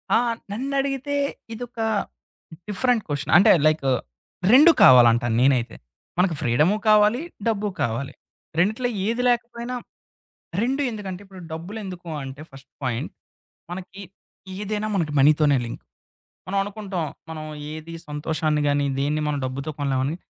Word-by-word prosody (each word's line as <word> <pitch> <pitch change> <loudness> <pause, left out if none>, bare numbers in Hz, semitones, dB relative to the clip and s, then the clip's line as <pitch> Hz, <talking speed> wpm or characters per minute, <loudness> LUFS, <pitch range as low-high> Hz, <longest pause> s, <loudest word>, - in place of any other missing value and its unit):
ఆ! - - +7 0.3
నన్నడిగితే 275 +3 -2 0.4
ఇదొక 235 0 -8 0.9
డిఫరెంట్ 225 +2 +1
క్వశ్చన్. 145 -1 -2
అంటే, 195 - +7 0.2
లైకు 155 -3 +1 0.6
రెండూ 300 +6 +9
కావాలంటాను 120 -2 +6
నేనైతే. 130 -3 +2 0.4
మనకి 180 -2 +2
ఫ్రీడము 150 - +3
కావాలి, 215 +4 +5 0.3
డబ్బు 210 -2 0
కావాలి. 115 +4 -2 0.5
రెండిట్లో 220 +7 +1 0.2
ఏది 235 +2 0
లేకపోయినా 240 +1 -2 0.9
రెండూ 265 +4 0
ఎందుకంటే, 200 -4 -6
ఇప్పుడు 190 -1 -12
డబ్బులెందుకు 180 +1 -7
అంటే 135 +2 -8
ఫస్ట్ 135 0 -15
పాయింట్ 120 -2 -2 0.6
మనకి 190 +2 -8 0.6
ఏదైనా, 210 +1 -3
మనకి 160 -5 -1
మనీతోనే 145 0 +5
లింక్. 115 - -8 0.7
మనం 195 - -1
అనుకుంటాం, 200 -4 -4 0.2
మనం 155 -1 -6 0.3
ఏది 155 +1 -8 0.2
సంతోషాన్ని 150 0 -1
గాని, 145 0 +2
దేన్ని 150 +2 0
మనం 145 -1 -1
డబ్బుతో 135 +4 -4
కొనలేమని. 135 +1 0
180 Hz, 120 wpm, -23 LUFS, 145-215 Hz, 0.9 s, రెండూ